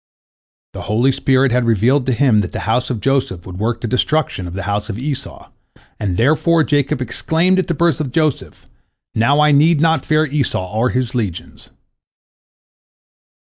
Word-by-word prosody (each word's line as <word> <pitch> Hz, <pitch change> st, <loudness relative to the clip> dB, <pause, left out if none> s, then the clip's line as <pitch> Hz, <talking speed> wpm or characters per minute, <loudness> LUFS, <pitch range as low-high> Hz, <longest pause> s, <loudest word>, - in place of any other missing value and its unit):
The -, -, -7 dB
holy 120 Hz, +6 st, +2 dB
spirit 130 Hz, 0 st, +1 dB
had 125 Hz, +1 st, +1 dB
revealed 120 Hz, +5 st, +2 dB
to -, -, +2 dB
him 120 Hz, -3 st, +3 dB
that 100 Hz, -, -3 dB
the -, -, -4 dB
house 115 Hz, +4 st, 0 dB
of 120 Hz, -5 st, -3 dB
Joseph 130 Hz, -10 st, -1 dB
would 90 Hz, 0 st, -9 dB
work 115 Hz, +2 st, -2 dB
the 120 Hz, -, -3 dB
destruction 125 Hz, -, -1 dB
of 90 Hz, -, -8 dB
the 100 Hz, -, -4 dB
house 105 Hz, +2 st, -3 dB
of 105 Hz, -, -4 dB
Esau, 135 Hz, +2 st, -6 dB, 0.5 s
and, 95 Hz, -4 st, -2 dB
therefore, 155 Hz, +6 st, +2 dB
Jacob 145 Hz, -2 st, 0 dB
exclaimed 165 Hz, +9 st, 0 dB
at 185 Hz, -, -1 dB
the 170 Hz, -, -1 dB
birth 170 Hz, 0 st, +1 dB
of 135 Hz, -4 st, -4 dB
Joseph, 155 Hz, -1 st, -2 dB, 0.5 s
"Now 135 Hz, +7 st, +2 dB
I 150 Hz, 0 st, +4 dB
need 150 Hz, +2 st, +4 dB
not 160 Hz, -2 st, +2 dB
fear 155 Hz, 0 st, +2 dB
Esau 135 Hz, -10 st, -2 dB
or 115 Hz, +3 st, +1 dB
his 125 Hz, -2 st, -2 dB
legions." 105 Hz, -9 st, -5 dB
130 Hz, 175 wpm, -17 LUFS, 110-150 Hz, 0.5 s, I